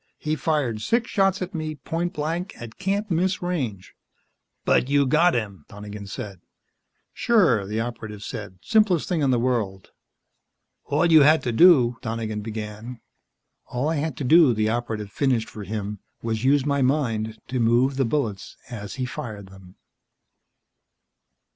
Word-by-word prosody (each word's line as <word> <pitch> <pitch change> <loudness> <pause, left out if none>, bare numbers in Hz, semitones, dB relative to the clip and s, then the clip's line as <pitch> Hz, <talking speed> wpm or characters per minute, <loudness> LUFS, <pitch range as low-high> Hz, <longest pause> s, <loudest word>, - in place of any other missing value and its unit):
He 155 0 -2
fired 135 -7 -1
six 235 - 0
shots 195 -2 +2
at 185 +3 -7
me, 155 -2 -4
point 170 +5 -3
blank 165 +5 -3
at 120 -2 -10
can't 200 +2 -1
miss 180 +3 +1
range." 130 - -3 0.7
"But 130 - +3
you 140 0 +3
got 160 +6 +3
him," 100 -8 -3
Donegan 105 0 -9
said. 100 -4 -7 0.7
"Sure," 165 - +3
the 110 +2 -2
Operative 110 -3 -6
said. 105 -5 -7
"Simplest 210 -7 +3
thing 175 -4 0
in 140 - +2
the 125 - +3
world." 115 -6 -2 0.9
"All 150 +4 +1
you 160 -2 +7
had 150 0 +5
to 120 - -1
do 125 -4 +6
" - - -42
Donegan 110 -2 -3
began. 110 +2 -7 0.7
"All 130 +5 -1
I 160 - 0
had 150 -2 -2
to - - -4
do," 150 -2 +6
the 110 0 +1
Operative 110 -3 -3
finished 125 -2 0
for 105 -2 -8
him, 105 0 -4 0.2
"was 110 -1 -2
use 140 +1 +3
my 140 -1 +1
mind 115 -5 0
to 130 0 -1
move 120 +4 +3
the 135 - +3
bullets 115 -6 -2
as 105 -4 -6
he 130 -1 -2
fired 105 -5 -7
them." 95 -1 -15
125 Hz, 160 wpm, -24 LUFS, 110-155 Hz, 0.9 s, you